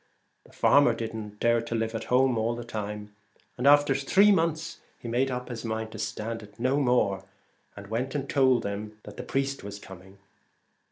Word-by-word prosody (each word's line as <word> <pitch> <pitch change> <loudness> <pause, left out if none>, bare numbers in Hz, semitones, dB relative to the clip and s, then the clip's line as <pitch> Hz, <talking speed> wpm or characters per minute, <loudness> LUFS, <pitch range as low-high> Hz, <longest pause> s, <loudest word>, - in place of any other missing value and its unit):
The - - -19
farmer 140 -5 +4
did 115 -1 -4
not 105 -2 -7
dare 115 0 +3
to 115 0 -4
live 115 0 -1
at 115 0 -4
home 130 +1 +3
the 110 - 0
while; 110 -3 -4 0.5
and 125 - +2
after 145 -1 +6
three 190 +10 +4
months 165 -3 0 0.2
he - - -9
made 125 +3 +1
up 125 -1 -4
his 120 -2 -6
mind 110 -1 -3
to - - -9
stand 115 +1 -4
it 105 +1 -15
no 130 +3 +1
more, 120 -8 +2 0.5
and 100 - -9
went 120 +7 -3
and 140 -1 -2
told 130 -4 +3
them 105 +1 -5
that - - -11
the - - -4
priest 135 -2 -2
was 100 0 -7
coming. 95 0 -13
115 Hz, 190 wpm, -27 LUFS, 110-135 Hz, 0.5 s, after